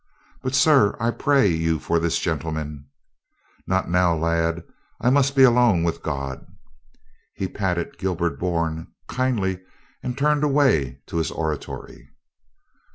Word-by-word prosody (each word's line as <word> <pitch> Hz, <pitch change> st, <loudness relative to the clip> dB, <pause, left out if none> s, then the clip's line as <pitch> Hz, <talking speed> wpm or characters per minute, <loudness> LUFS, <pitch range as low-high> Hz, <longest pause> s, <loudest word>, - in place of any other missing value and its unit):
"But, 130 Hz, +1 st, -2 dB
sir, 140 Hz, -7 st, +5 dB
I 115 Hz, +1 st, +1 dB
pray 140 Hz, 0 st, +2 dB
you 80 Hz, -3 st, +1 dB
for 85 Hz, +2 st, 0 dB
this 85 Hz, 0 st, 0 dB
gentleman 80 Hz, -3 st, -4 dB, 0.2 s
— -, -, -51 dB
" -, -, -36 dB
"Not 95 Hz, 0 st, 0 dB
now, 90 Hz, -1 st, +3 dB
lad. 85 Hz, +1 st, 0 dB, 0.4 s
I 125 Hz, -, +2 dB
must 140 Hz, 0 st, +3 dB
be 135 Hz, -, +6 dB
alone 120 Hz, -8 st, +5 dB
with 85 Hz, -1 st, -1 dB
God." 70 Hz, -3 st, -4 dB, 0.9 s
He 95 Hz, -, -2 dB
patted 90 Hz, -4 st, -3 dB
Gilbert 90 Hz, -2 st, -1 dB
Bourne 85 Hz, -2 st, -2 dB, 0.2 s
kindly 110 Hz, -8 st, -1 dB, 0.4 s
and 125 Hz, 0 st, -4 dB
turned 150 Hz, +1 st, +2 dB
away 130 Hz, -, +2 dB
to -, -, -5 dB
his 80 Hz, -3 st, 0 dB
oratory. 80 Hz, -2 st, -5 dB
90 Hz, 140 wpm, -23 LUFS, 80-125 Hz, 0.9 s, be